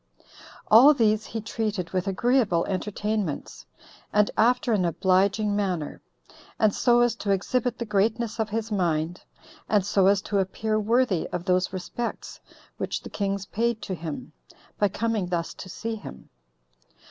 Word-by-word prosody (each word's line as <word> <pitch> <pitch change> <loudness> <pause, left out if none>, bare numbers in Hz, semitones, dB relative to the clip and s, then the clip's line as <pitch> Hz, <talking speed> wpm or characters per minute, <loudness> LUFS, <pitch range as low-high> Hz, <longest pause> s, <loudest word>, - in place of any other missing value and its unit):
All 265 +7 +8
these 215 -3 +2
he 225 - -4
treated 210 -5 -3
with 185 +1 -1
agreeable 200 -3 +2
entertainments, 205 -2 -3 0.4
and 210 0 +3
after 240 +1 +3
an 200 -4 +2
obliging 195 +4 +2
manner, 185 -7 -2 0.6
and 215 -2 +3
so 240 -1 +3
as 240 -2 +3
to 205 - -4
exhibit 235 +5 0
the 235 - -4
greatness 220 +2 0
of 220 -1 0
his 225 +1 -3
mind, 170 -3 -1 0.5
and 205 -3 +3
so 195 -1 +3
as 200 0 +3
to 200 - 0
appear 215 +3 -1
worthy 220 -4 +1
of 175 - -5
those 185 -1 +1
respects 190 +6 -5 0.4
which - - -3
the - - -9
kings 200 -1 -2
paid 230 +2 -1
to 190 - -4
him, 160 -2 -6 0.5
by 205 - +4
coming 220 -2 -1
thus 170 -2 -2
to 185 - -10
see 225 +5 -4
him. 210 - -10
205 Hz, 150 wpm, -26 LUFS, 185-225 Hz, 0.6 s, All